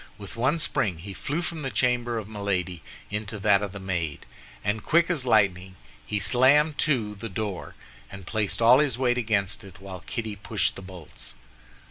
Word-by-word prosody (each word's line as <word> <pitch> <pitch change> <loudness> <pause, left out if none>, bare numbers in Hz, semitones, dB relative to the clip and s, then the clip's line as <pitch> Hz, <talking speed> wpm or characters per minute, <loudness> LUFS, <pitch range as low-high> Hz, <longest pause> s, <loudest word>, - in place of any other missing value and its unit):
With 100 +1 -9
one 130 +7 +2
spring 105 - 0
he 95 +5 -8
flew 150 - -2
from 165 -2 -4
the 135 - -2
chamber 120 +1 +1
of 110 -3 -4
Milady 95 -5 -2 0.3
into 105 +1 -3
that 100 -1 +4
of 100 -2 -3
the 100 - -7
maid, 85 -6 -3 0.4
and 105 +1 -1
quick 170 +2 +3
as 145 -7 0
lightning, 95 -5 +2 0.3
he 105 - -2
slammed 130 +9 +4
to 120 -9 +1
the 105 +2 -7
door, 100 -1 -4 0.4
and 95 -1 -9
placed 110 +2 -1
all 125 +3 +8
his 140 -6 +1
weight 125 -1 +2
against 105 -4 +1
it, 95 -3 -13
while 95 -1 -8
Kitty 110 -3 -3
pushed 100 -1 0
the - - -8
bolts. 90 -9 -9
105 Hz, 180 wpm, -26 LUFS, 95-125 Hz, 0.4 s, all